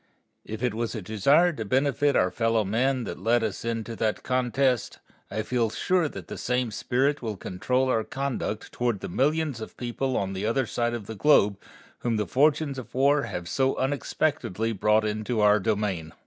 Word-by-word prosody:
If 110 +2 -6
it 125 -3 +1
was 115 +2 -3
a 110 - -4
desire 140 - +3
to 115 - -4
benefit 140 +5 +1
our 90 0 +3
fellow 115 -2 +1
men 125 +5 +1
that - - -6
led 115 +4 +2
us 105 -4 -3
into 115 0 -3
that 110 -1 -1
contest, 130 0 0 0.3
I 110 - -2
feel 115 -1 0
sure 175 - +1
the - - -8
same 125 -2 0
spirit 135 +7 0
will 110 -4 -4
control 125 +10 -1
our 115 -3 +1
conduct 135 -6 -4
toward 120 -5 -1
the - - -4
millions 145 - 0
of 110 - -8
people 125 +2 -2
on 95 0 -2
the 95 +1 -4
other 115 +4 +1
side 120 +1 -1
of 115 -4 -6
the 110 - -6
globe 105 -5 +4 0.4
whom 115 -2 -1
the 105 - 0
fortunes 140 - +2
of 120 -1 -11
war 140 +2 +4
have 90 -6 -5
so 135 +9 +1
unexpectedly 130 -5 -1
brought 110 +1 +2
into 110 +2 -2
our 105 0 +5
dominion. 100 -6 -1
115 Hz, 185 wpm, -26 LUFS, 105-135 Hz, 0.4 s, our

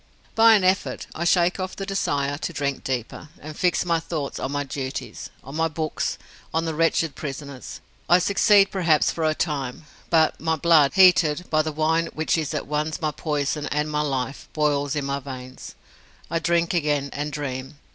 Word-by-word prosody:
By 225 0 +7
an 200 - +2
effort, 185 +1 +1
I 170 - -3
shake 175 +1 +3
off 185 0 -4
the 195 - -5
desire 145 -7 -1
to - - -3
drink 140 -3 -3
deeper, 130 +3 -4
and 155 +1 -9
fix 175 -3 +1
my 170 -1 +1
thoughts 155 -4 -4
on 130 - -3
my 145 0 -1
duties, 135 -1 -6
on 135 +3 -9
my 165 +1 +2
books, 155 0 -3 0.3
on 165 +1 0
the 160 - -2
wretched 165 -1 +1
prisoners. 140 -2 -7 0.3
I 175 - +7
succeed 200 +2 +4
perhaps 170 -6 +2
for 165 - -4
a 155 0 +2
time; 145 -3 -3 0.2
but 160 -2 +3
my 160 0 +1
blood, 155 -3 +4
heated 180 -3 +5
by 155 -1 +4
the 155 0 -3
wine 160 +2 +1
which 155 0 +1
is 160 -3 -2
at - - -3
once 150 +1 -2
my 155 -2 -1
poison 150 -1 -2
and 150 +1 -1
my 150 0 0
life, 135 -2 -3
boils 145 -2 0
in 145 -2 -2
my 140 0 -2
veins. 130 -1 -9 0.6
I 165 - +1
drink 170 +1 +1
again, 145 -4 0
and 145 +1 -3
dream. 135 -1 -5
155 Hz, 185 wpm, -24 LUFS, 140-165 Hz, 0.6 s, By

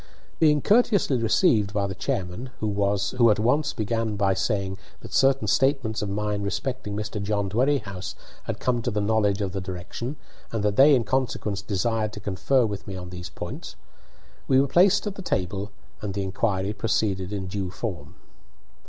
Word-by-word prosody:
Being 150 -3 +4
courteously 205 - +3
received 110 - +3
by 100 -2 +1
the 95 - -3
chairman 95 +9 -3
(who 105 +3 +2
at 105 - +4
once 135 +7 +2
began 110 0 -1
by 100 -1 +2
saying 95 0 -1 0.2
that - - -10
certain 135 0 +3
statements 135 -5 +2
of 105 - -2
mine 105 0 -1
respecting 105 +2 -3
Mr. 105 0 -3
John 100 0 0
Dwerrihouse 110 -6 0 0.3
had - - -4
come 120 -2 0
to - - -1
the 105 - -1
knowledge 105 -1 +2
of 95 -2 -1
the 95 0 -3
direction, 95 +9 -5 0.4
and 110 -3 -2
that 105 -1 +1
they 140 +4 +7
in 120 - +2
consequence 115 -6 -1
desired 110 +2 -1
to - - -7
confer 105 +6 +1
with 100 -2 -5
me 95 - -5
on 90 -1 -7
those 90 -1 -7
points), - - -7 0.7
we 130 - +5
were 140 - +3
placed 180 +9 +4
at 205 - -2
the 195 - -8
table 100 - -2 0.3
and 100 -2 -4
the 100 - -1
inquiry 95 +1 -1
proceeded 100 -3 0
in 100 -2 -3
due 95 0 -3
form. 90 -3 -6
105 Hz, 175 wpm, -25 LUFS, 100-120 Hz, 0.7 s, they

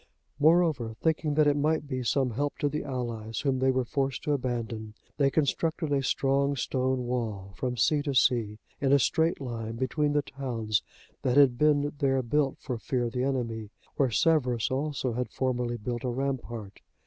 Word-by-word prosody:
Moreover, 155 -7 +3
thinking 160 -2 0
that 155 0 +5
it 145 -1 +4
might 150 +1 +1
be 130 -2 -3
some 130 +1 +1
help 145 +5 -2
to 145 - 0
the 150 +1 -2
allies, 115 -4 -4
whom 135 -3 0
they 130 +1 +3
were 130 -1 +1
forced 135 0 -2
to 150 - 0
abandon, 115 -5 -3 0.2
they 140 -2 +4
constructed 155 +2 0
a 140 - +2
strong 140 +1 +1
stone 130 -1 -1
wall 110 -6 -3
from 125 +2 -3
sea 145 +6 +3
to 140 -2 -2
sea, 115 -5 +3 0.2
in 135 -1 +1
a - - +8
straight 160 +5 +1
line 115 -4 -5
between 145 +4 0
the 145 -1 +2
towns 120 -7 -2 0.4
that 130 +1 +1
had 130 -4 +5
been 145 -1 +3
there 135 -3 +2
built 135 +3 +1
for 125 -3 -5
fear 125 +2 -1
of 120 - -2
the 125 - -1
enemy, 115 -5 -2 0.3
where 135 -3 +2
Severus 125 -3 +2
also 135 -2 -1
had 125 +2 -2
formerly 125 -2 -1
built 120 +2 -4
a 125 - -1
rampart. 120 -5 -4
130 Hz, 185 wpm, -28 LUFS, 120-145 Hz, 0.4 s, a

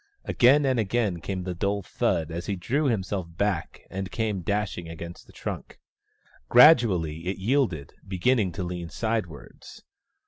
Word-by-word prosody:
Again 140 +4 +4
and 130 -3 +2
again 105 -4 0
came 95 +1 -4
the 90 0 -3
dull 100 +3 -1
thud 80 -1 -1
as 85 +1 -5
he 100 - -1
drew 135 - -1
himself 100 -7 -1
back 105 0 -1
and 95 0 -5
came 105 -4 -2
dashing 95 -3 -2
against 85 +1 -9
the - - -16
trunk. - - -6 0.7
Gradually 95 - +5
it 95 - -2
yielded, 100 - 0
beginning 95 +2 +1
to 90 +2 -4
lean 85 -1 -5
sidewards. 110 -9 -5
95 Hz, 145 wpm, -26 LUFS, 85-115 Hz, 0.7 s, Gradually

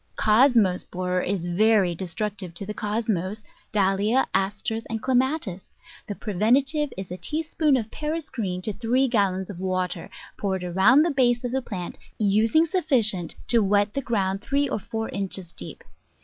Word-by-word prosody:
Cosmos 215 -5 +4
Borer 180 0 -2
is 185 -2 -2
very 195 0 +3
destructive 190 +1 -4
to 200 - -4
the 210 - -4
Cosmos, 210 -2 -2 0.3
Dahlia, 205 +5 +2
Asters, 210 +3 -1
and 225 0 -3
Clematis; 255 - 0 0.5
the 205 - -4
preventive 265 - +1
is 190 -2 -6
a 180 - -4
tea 300 - -1
spoonful 305 -4 +1
of 220 - -11
Paris 310 +1 -4
green 185 -7 -3
to 215 - 0
three 245 +5 +1
gallons 195 -5 0
of 180 - -10
water, 185 -2 -2 0.3
poured 190 -2 -2
around 190 - +5
the 340 - +1
base 245 -3 +2
of 245 - -2
the 265 +1 0
plant, 185 -8 -6 0.2
using 220 +9 +3
sufficient 250 - +1
to 235 - +5
wet 205 +1 +2
the 275 - -1
ground 195 -5 -1
three 280 +5 0
or - - -2
four 225 +2 -4
inches 190 -3 -3
deep. 90 - -9
210 Hz, 165 wpm, -25 LUFS, 190-250 Hz, 0.5 s, around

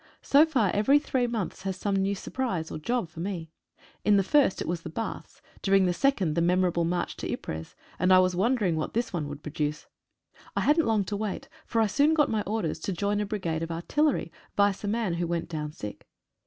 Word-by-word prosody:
So 295 +3 +6
far 240 - +2
every 240 +8 +4
three 260 -4 0
months 220 -6 -3
has 190 -1 -3
some 200 +1 -1
new 195 +1 +1
surprise 190 -7 -3
or - - -5
job 235 +4 -1
for 160 0 -12
me. 170 -3 -4 0.5
In 210 -1 +5
the 195 - +3
first 275 0 +3
it - - -3
was 170 0 -2
baths, 225 +8 -6 0.2
during 195 -1 +4
the 180 - +2
second 195 - +1
the 170 - +1
memor 180 +2 +3
able 170 -1 0
march 175 +1 -1
to - - -4
Ypres, 80 +1 -5 0.2
and 185 +1 +3
I 185 - +8
was 185 -1 +3
wondering 205 -3 +2
what 155 +5 -3
this 235 -2 -1
one 155 -4 -2
would 145 0 -8
produce. 150 0 -3 0.7
I - - +1
hadn't 305 0 +3
long 220 -3 +2
to 205 +2 -4
wait, 205 -1 -4 0.2
for 230 - 0
I - - +4
soon 290 +9 +3
got 295 -2 +3
my 220 -1 +1
orders 200 -7 -1
to 195 - -3
join 205 +3 0
a 210 - -2
brigade 175 -6 -2
of 165 - -3
artillery, 215 - 0 0.3
vice 200 -1 +2
a - - -2
man 215 -3 0
who 170 0 -1
went 170 0 -2
down 150 -2 -4
sick. 105 -8 -8
195 Hz, 220 wpm, -27 LUFS, 170-225 Hz, 0.7 s, I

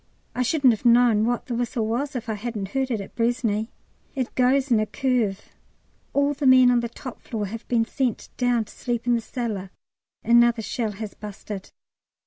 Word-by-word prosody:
I 250 - -2
shouldn't 255 -1 +4
have 220 - -6
known 235 -2 +5
what 245 0 -1
the 250 - -4
whistle 235 -1 -1
was 255 +6 -2
if 240 -1 -4
I 220 - -1
hadn't 210 -2 -4
heard 265 +3 -1
it 225 -5 -1
at 195 - -10
Braisne. 230 -2 0 0.5
It 260 -3 -2
goes 260 +2 +2
in 230 - +5
a 215 - 0
curve. 240 -8 -1 0.6
All 285 +1 +2
the 285 -1 -1
men 255 -1 +7
on 245 - +3
the 235 0 -3
top 245 +1 -9
floor 215 -3 -4
have 225 +3 -7
been 230 -2 +2
sent 250 -2 -2
down 245 -3 +1
to - - -15
sleep 240 -2 -3
in 245 - +3
the 235 - +1
cellar; 215 -6 -4 0.5
another 235 0 +4
shell 220 +1 -2
has 210 0 -7
busted. 205 -1 -8
235 Hz, 195 wpm, -24 LUFS, 220-250 Hz, 0.6 s, men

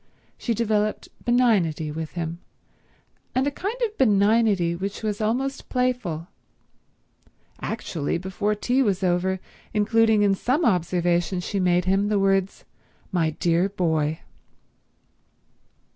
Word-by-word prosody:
She 235 - -2
developed 215 -1 0
benignity 200 -11 +2
with 160 +1 -5
him, 170 -1 -4 1.0
and 260 +1 +2
a 285 - 0
kind 400 - -4
of 430 -1 -8
benignity 205 -5 +3
which 195 +5 -5
was 210 0 -2
almost 265 +6 -1
playful—actually 200 - -5
before 190 +4 -2
tea 245 +5 +1
was 200 -6 +1
over 185 +1 +1 0.4
including 220 0 +3
in 200 -1 +4
some 260 - 0
observation 175 -1 +1
she 195 +3 -3
made 180 -1 +2
him 195 +2 +2
the 210 0 +1
words 195 -1 +1 0.5
"My 170 -4 +1
dear 170 +4 +1
boy." 160 -5 0
195 Hz, 115 wpm, -24 LUFS, 175-225 Hz, 1.0 s, in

